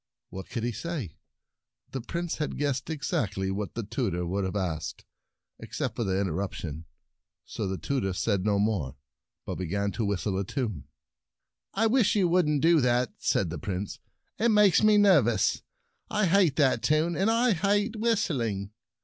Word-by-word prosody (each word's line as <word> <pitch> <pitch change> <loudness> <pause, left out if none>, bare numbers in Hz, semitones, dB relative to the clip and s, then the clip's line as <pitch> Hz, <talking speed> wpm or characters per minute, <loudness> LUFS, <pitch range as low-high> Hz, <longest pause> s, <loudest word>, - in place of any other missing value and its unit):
What 95 0 -8
could 120 -2 -4
he 120 - 0
say? 140 - -4 0.8
The 135 - -4
Prince 170 +7 -3
had 150 - -3
guessed 140 -3 -1
exactly 105 - -2
what 100 -1 -4
the 115 - -3
tutor 100 -5 -2
would 95 +3 -1
have 95 - -4
asked, 80 -6 -3 0.5
except - - -4
for 115 - -1
the 95 -2 0
interrup 95 0 -2
tion. 80 0 -6 0.6
So - - -4
the 95 0 -3
tutor 125 -6 -1
said 100 +1 0
no 105 0 +2
more, 100 - 0 0.5
but - - -5
began 100 +3 -1
to 115 - -3
whistle 100 -1 -1
a - - 0
tune. 100 - -3 0.5
" - - -61
I 220 +3 +2
wish 225 -2 +3
you 195 -4 +3
wouldn't 150 -5 +2
do 165 -2 +5
that," 125 -1 +1
said 90 -5 0
the 85 - -5
Prince. 95 +4 -4 0.4
"It 235 +2 +3
makes 210 -5 +5
me 215 -1 +5
nervous. 145 - +4 0.5
I 210 -1 +1
hate 180 -5 +3
that 130 -6 +3
tune, 155 +3 +2
and 195 +4 +2
I 230 +1 +3
hate 205 +5 +1
whistling." 140 - -1
120 Hz, 170 wpm, -28 LUFS, -, 0.8 s, do